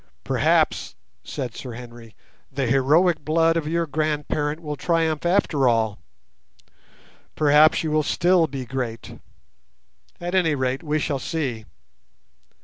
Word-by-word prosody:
"Perhaps," -, -, +1 dB, 0.3 s
said 125 Hz, -5 st, -5 dB
Sir 125 Hz, 0 st, -8 dB
Henry, 120 Hz, -2 st, -11 dB, 0.4 s
"the 135 Hz, 0 st, -2 dB
heroic 150 Hz, +7 st, +3 dB
blood 165 Hz, +2 st, +2 dB
of 165 Hz, -3 st, -1 dB
your 170 Hz, +1 st, 0 dB
grandparent 150 Hz, 0 st, -2 dB
will 150 Hz, -3 st, -5 dB
triumph 165 Hz, 0 st, 0 dB
after 165 Hz, -7 st, +2 dB
all; 110 Hz, -3 st, 0 dB, 1.4 s
perhaps 150 Hz, +1 st, +4 dB
you 155 Hz, -, -2 dB
will 155 Hz, 0 st, +3 dB
still 175 Hz, +2 st, +2 dB
be 135 Hz, -2 st, -6 dB
great. 120 Hz, -3 st, -5 dB, 1.0 s
At 175 Hz, +1 st, -5 dB
any 170 Hz, -5 st, +2 dB
rate 130 Hz, 0 st, -1 dB
we 155 Hz, -1 st, -1 dB
shall 145 Hz, -2 st, -2 dB
see. 130 Hz, -8 st, -3 dB
150 Hz, 125 wpm, -23 LUFS, 130-165 Hz, 1.4 s, perhaps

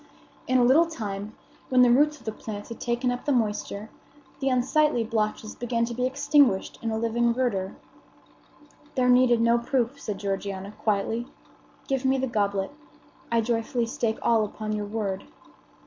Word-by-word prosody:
In 255 Hz, -, +3 dB
a 250 Hz, -, +4 dB
little 285 Hz, +8 st, +5 dB
time, 210 Hz, -8 st, -5 dB, 0.3 s
when 255 Hz, -1 st, +5 dB
the 245 Hz, -, +5 dB
roots 295 Hz, +4 st, +4 dB
of 260 Hz, -, -20 dB
the 220 Hz, -, -2 dB
plant 210 Hz, 0 st, -7 dB
had 230 Hz, -, -8 dB
taken 245 Hz, +1 st, 0 dB
up 245 Hz, -, -5 dB
the 290 Hz, -, +1 dB
moisture, 215 Hz, -3 st, -1 dB, 0.5 s
the 270 Hz, -, +1 dB
unsightly 265 Hz, +1 st, +2 dB
blotches 215 Hz, -1 st, -2 dB
began 235 Hz, -1 st, -1 dB
to 235 Hz, -, -5 dB
be 250 Hz, +2 st, 0 dB
extinguished 280 Hz, -6 st, +2 dB
in 230 Hz, -, -2 dB
a 220 Hz, -, -1 dB
living 235 Hz, +1 st, +1 dB
verdure. 205 Hz, -7 st, -1 dB, 1.2 s
"There 250 Hz, -2 st, +2 dB
needed 250 Hz, -2 st, +5 dB
no 235 Hz, +1 st, +4 dB
proof," 250 Hz, +2 st, -1 dB
said 210 Hz, -2 st, -4 dB
Georgiana, 195 Hz, 0 st, -4 dB
quietly. 225 Hz, +3 st, 0 dB, 0.6 s
"Give 270 Hz, -1 st, -1 dB
me 265 Hz, 0 st, +3 dB
the 265 Hz, -, 0 dB
goblet 200 Hz, -5 st, -1 dB, 0.6 s
I 230 Hz, -1 st, +3 dB
joyfully 230 Hz, +1 st, 0 dB
stake 230 Hz, -3 st, -1 dB
all 225 Hz, -2 st, +3 dB
upon 215 Hz, +1 st, -5 dB
your 210 Hz, -1 st, -2 dB
word." 205 Hz, -3 st, -3 dB
235 Hz, 165 wpm, -26 LUFS, 215-255 Hz, 1.2 s, little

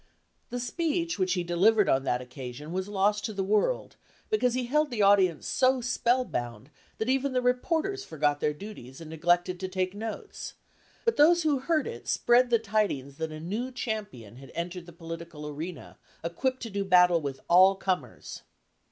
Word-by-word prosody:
The 245 Hz, -, -3 dB
speech 335 Hz, -, -1 dB
which 185 Hz, -1 st, +2 dB
he 180 Hz, -2 st, -1 dB
delivered 195 Hz, +5 st, +3 dB
on 135 Hz, 0 st, +2 dB
that 125 Hz, -1 st, 0 dB
occasion 130 Hz, +4 st, -8 dB
was 190 Hz, +2 st, -2 dB
lost 205 Hz, +1 st, +1 dB
to 220 Hz, -, -3 dB
the 195 Hz, -1 st, -2 dB
world 215 Hz, -, 0 dB, 0.3 s
because 250 Hz, -, +2 dB
he 255 Hz, -1 st, -1 dB
held 300 Hz, +4 st, +1 dB
the 225 Hz, -5 st, 0 dB
audience 190 Hz, -5 st, +4 dB
so 260 Hz, 0 st, +2 dB
spell 250 Hz, +1 st, +1 dB
bound 120 Hz, -, -5 dB, 0.3 s
that 220 Hz, -, -2 dB
even 265 Hz, +1 st, +1 dB
the 255 Hz, -, +2 dB
reporters 330 Hz, +11 st, 0 dB
forgot 145 Hz, -2 st, 0 dB
their 150 Hz, -, +1 dB
duties 150 Hz, -, -10 dB
and 160 Hz, -1 st, -9 dB
neglected 175 Hz, +2 st, +1 dB
to 190 Hz, -, -3 dB
take 185 Hz, 0 st, -2 dB
notes; 220 Hz, +2 st, -6 dB, 0.5 s
but 460 Hz, -, +2 dB
those 335 Hz, +3 st, +6 dB
who 295 Hz, -4 st, +2 dB
heard 310 Hz, +3 st, +1 dB
it 465 Hz, 0 st, -7 dB
srjread 245 Hz, +1 st, +3 dB
the 235 Hz, -, +5 dB
tidings 200 Hz, -11 st, -1 dB
that 160 Hz, -1 st, -3 dB
a 155 Hz, -, -7 dB
new 215 Hz, +10 st, -3 dB
champion 205 Hz, -, -5 dB
had 135 Hz, -1 st, -12 dB
entered 175 Hz, +1 st, -5 dB
the -, -, -10 dB
political 165 Hz, -2 st, -8 dB
arena 155 Hz, +3 st, -7 dB, 0.2 s
equipped 255 Hz, +11 st, -2 dB
to 230 Hz, -, -6 dB
do 200 Hz, 0 st, -1 dB
battle 180 Hz, -3 st, +5 dB
with 140 Hz, -2 st, -4 dB
all 185 Hz, +3 st, +6 dB
comers. 180 Hz, -, -4 dB
195 Hz, 180 wpm, -28 LUFS, 165-250 Hz, 0.5 s, those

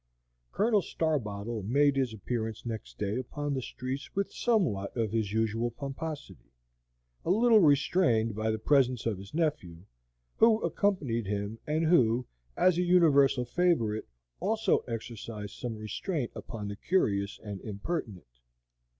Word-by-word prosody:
Colonel 210 Hz, 0 st, +2 dB
Starbottle 115 Hz, -, -2 dB
made 140 Hz, +7 st, +3 dB
his 130 Hz, -3 st, +1 dB
appearance 110 Hz, +1 st, -4 dB
next 115 Hz, -2 st, -6 dB
day 105 Hz, +2 st, -1 dB
upon 145 Hz, +3 st, -3 dB
the 130 Hz, -, -1 dB
streets 130 Hz, +3 st, -6 dB
with 200 Hz, 0 st, -1 dB
somewhat 125 Hz, -, 0 dB
of 110 Hz, -3 st, 0 dB
his 110 Hz, -3 st, -1 dB
usual 110 Hz, +2 st, 0 dB
pomposity, 140 Hz, -, -7 dB, 0.7 s
a -, -, -3 dB
little 225 Hz, +3 st, +5 dB
restrained 140 Hz, -, +3 dB
by 110 Hz, +2 st, -1 dB
the 110 Hz, -, 0 dB
presence 130 Hz, 0 st, +2 dB
of 110 Hz, -5 st, -1 dB
his 100 Hz, +1 st, -11 dB
nephew, 145 Hz, -, -2 dB, 0.5 s
who 225 Hz, -1 st, +5 dB
accompanied 140 Hz, -, 0 dB
him, 100 Hz, +2 st, -3 dB
and 155 Hz, +2 st, +1 dB
who, 125 Hz, -7 st, +3 dB, 0.3 s
as 180 Hz, -2 st, +4 dB
a -, -, +3 dB
universal 145 Hz, -8 st, +4 dB
favorite, 120 Hz, -8 st, +1 dB, 0.3 s
also 220 Hz, +2 st, +2 dB
exercised 115 Hz, -3 st, -6 dB
some 120 Hz, -3 st, -5 dB
restraint 120 Hz, -, -3 dB
upon 105 Hz, -4 st, -6 dB
the 100 Hz, -, -5 dB
curious 100 Hz, -, 0 dB
and 100 Hz, -3 st, -6 dB
impertinent. 100 Hz, -, -5 dB
120 Hz, 135 wpm, -30 LUFS, 110-160 Hz, 0.7 s, little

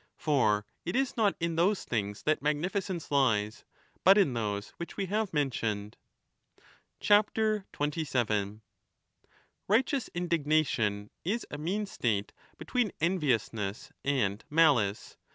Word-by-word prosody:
For 110 Hz, -9 st, +2 dB, 0.2 s
it 175 Hz, -, -3 dB
is 270 Hz, 0 st, +1 dB
not 210 Hz, -4 st, +2 dB
in 165 Hz, -1 st, -1 dB
those 190 Hz, +4 st, +2 dB
things 105 Hz, -3 st, -3 dB
that 155 Hz, 0 st, +1 dB
magnificence 175 Hz, +4 st, -2 dB
lies, 110 Hz, -7 st, +1 dB, 0.4 s
but 195 Hz, +2 st, +7 dB
in 185 Hz, -11 st, +4 dB
those 105 Hz, -3 st, -2 dB
which 170 Hz, -, -7 dB
we 200 Hz, -, -1 dB
have 210 Hz, +1 st, -1 dB
mentioned. 115 Hz, -8 st, -1 dB, 1.1 s
Righteous 210 Hz, 0 st, +3 dB, 2.5 s
indignation 150 Hz, -11 st, 0 dB
is 215 Hz, +7 st, -1 dB
a 145 Hz, -, -4 dB
mean 195 Hz, +7 st, -1 dB
state 110 Hz, -, -1 dB, 0.2 s
between 245 Hz, -6 st, -1 dB
envious 150 Hz, -, +1 dB
27 -, -, -14 dB
ness 100 Hz, +3 st, -9 dB
and 115 Hz, -7 st, 0 dB
malice. 140 Hz, -11 st, +2 dB
150 Hz, 115 wpm, -30 LUFS, -, 2.5 s, but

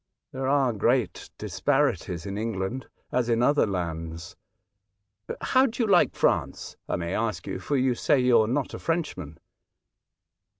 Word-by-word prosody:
There 130 Hz, 0 st, -3 dB
are 135 Hz, -3 st, +2 dB
great 120 Hz, +2 st, 0 dB
disparities 85 Hz, 0 st, 0 dB
in 100 Hz, 0 st, -4 dB
England 110 Hz, +3 st, -3 dB, 0.2 s
as 125 Hz, -1 st, 0 dB
in 115 Hz, 0 st, +2 dB
other 145 Hz, -1 st, +3 dB
lands. 85 Hz, -2 st, -4 dB, 1.1 s
How 260 Hz, +1 st, +3 dB
do 235 Hz, 0 st, -2 dB
you -, -, 0 dB
like 185 Hz, -4 st, +4 dB
France? -, -, 0 dB
I -, -, 0 dB
may 85 Hz, +1 st, -3 dB
ask 110 Hz, 0 st, -2 dB
you; 95 Hz, -1 st, -4 dB
for 140 Hz, +10 st, -1 dB
you 130 Hz, -1 st, +2 dB
say 130 Hz, +3 st, +2 dB
you 125 Hz, -1 st, +5 dB
are 110 Hz, -, +1 dB
not 130 Hz, +4 st, -1 dB
a -, -, -6 dB
Frenchman." 150 Hz, -, -3 dB
115 Hz, 155 wpm, -26 LUFS, 95-135 Hz, 1.1 s, you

